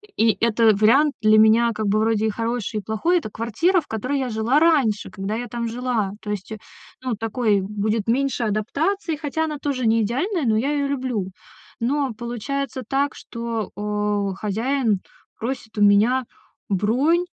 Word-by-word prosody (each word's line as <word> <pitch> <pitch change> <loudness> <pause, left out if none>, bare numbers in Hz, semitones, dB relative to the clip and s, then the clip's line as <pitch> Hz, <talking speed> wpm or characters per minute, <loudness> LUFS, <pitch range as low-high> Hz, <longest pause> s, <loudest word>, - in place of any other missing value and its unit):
и 225 -1 +3
это 230 -1 +4
вариант 265 +9 +4
для 215 0 +5
меня 225 +2 +5
как 215 -1 -2
бы 210 +2 +2
вроде 220 0 +1
и - - +1
хороший, 230 0 -2
и 205 - -9
плохой. 325 +12 +1
Это 310 - -3
квартира, 235 - +1
в - - -21
которой 255 +6 -2
я 260 - -2
жила 230 +6 +2
раньше, 280 -11 +2
когда 195 +2 -4
я 245 +1 -4
там 235 +1 -3
жила. 230 -4 -1
То 210 - -5
есть, 205 +1 -5
э, 220 - -6 0.5
ну, 255 -3 -1
такой 220 -2 0
будет 210 +2 -2
меньше 260 0 +1
адаптации, 310 - -1
хотя 310 +1 -2
она 300 -2 -4
тоже 255 -5 -1
не 225 +1 +3
идеальная, 285 - -1
но 215 -1 +2
я 275 +6 0
её 285 -1 0
люблю. 250 -9 -2 0.5
Но 270 +2 0
получается 245 +3 -4
так, 275 0 0
что, 230 -3 -5
о, 205 -1 -1
хозяин 220 +1 0 0.4
просит 230 -2 -5
у 210 - 0
меня 215 +6 +4 0.4
бронь, 255 - +2
230 Hz, 175 wpm, -22 LUFS, 215-275 Hz, 0.5 s, для